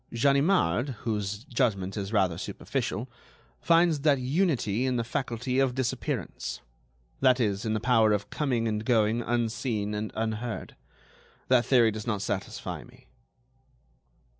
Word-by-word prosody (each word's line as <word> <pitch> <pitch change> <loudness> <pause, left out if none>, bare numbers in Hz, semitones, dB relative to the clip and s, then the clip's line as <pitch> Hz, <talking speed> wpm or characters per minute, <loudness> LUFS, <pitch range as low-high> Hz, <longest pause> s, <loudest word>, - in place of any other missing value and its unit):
Ganimard, 140 - +3
whose 105 -1 -2
judgment 110 -8 -1
is 100 -1 -4
rather 95 -6 +1
superficial, - - -3 0.5
finds 165 - +3
that 145 -1 +3
unity 130 - 0
in 130 - 0
the 120 - 0
faculty 125 +2 -2
of 130 -2 +2
disappearance; 130 -2 -3 0.6
that 130 -1 +4
is, 100 -3 0
in 110 - 0
the - - 0
power 115 -2 +4
of 100 -1 -1
coming 125 -6 0
and 105 -1 -1
going 110 -1 +2
unseen 115 -2 -1
and 105 +1 -3
unheard. 110 +1 -3 0.7
That 125 -2 +4
theory 120 -4 +5
does 110 +1 -6
not 105 -4 -1
satisfy - - -4
me." - - -19
115 Hz, 135 wpm, -28 LUFS, 105-130 Hz, 0.7 s, theory